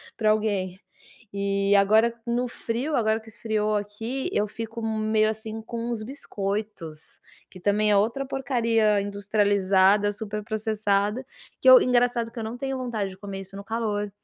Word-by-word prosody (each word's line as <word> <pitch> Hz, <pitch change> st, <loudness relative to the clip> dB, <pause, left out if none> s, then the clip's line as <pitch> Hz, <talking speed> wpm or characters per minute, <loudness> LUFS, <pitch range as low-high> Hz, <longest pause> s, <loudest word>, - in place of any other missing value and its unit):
para 215 Hz, -2 st, +3 dB
alguém. 200 Hz, -4 st, -1 dB, 0.5 s
E 200 Hz, 0 st, +1 dB
agora 215 Hz, +4 st, +4 dB
no 240 Hz, +1 st, 0 dB
frio, 245 Hz, +5 st, -3 dB
agora 220 Hz, -2 st, +2 dB
que 225 Hz, -, -20 dB
esfriou 215 Hz, -1 st, -1 dB
aqui, 225 Hz, -, -3 dB
eu 210 Hz, -, +1 dB
fico 225 Hz, +2 st, -6 dB
meio 215 Hz, -1 st, +1 dB
assim 220 Hz, 0 st, -5 dB
com 230 Hz, +1 st, -5 dB
os 235 Hz, -2 st, -3 dB
biscoitos, 205 Hz, -, -5 dB, 0.3 s
que 185 Hz, -, -13 dB
também 210 Hz, +3 st, +2 dB
é 205 Hz, -, +5 dB
outra 230 Hz, +7 st, +1 dB
porcaria 230 Hz, -6 st, +1 dB
industrializada, 200 Hz, 0 st, +2 dB
superprocessada, 210 Hz, +1 st, -1 dB, 0.4 s
que -, -, +6 dB
eu -, -, +10 dB
engraçado 245 Hz, -, +2 dB
que 235 Hz, -, -8 dB
eu -, -, -3 dB
não 220 Hz, +2 st, -4 dB
tenho 270 Hz, +1 st, -3 dB
vontade 230 Hz, -6 st, -2 dB
de 185 Hz, -, -12 dB
comer 195 Hz, -1 st, -6 dB
isso 195 Hz, +1 st, -10 dB
no 200 Hz, -, -7 dB
calor, 215 Hz, -2 st, -2 dB
215 Hz, 155 wpm, -25 LUFS, 205-230 Hz, 0.5 s, eu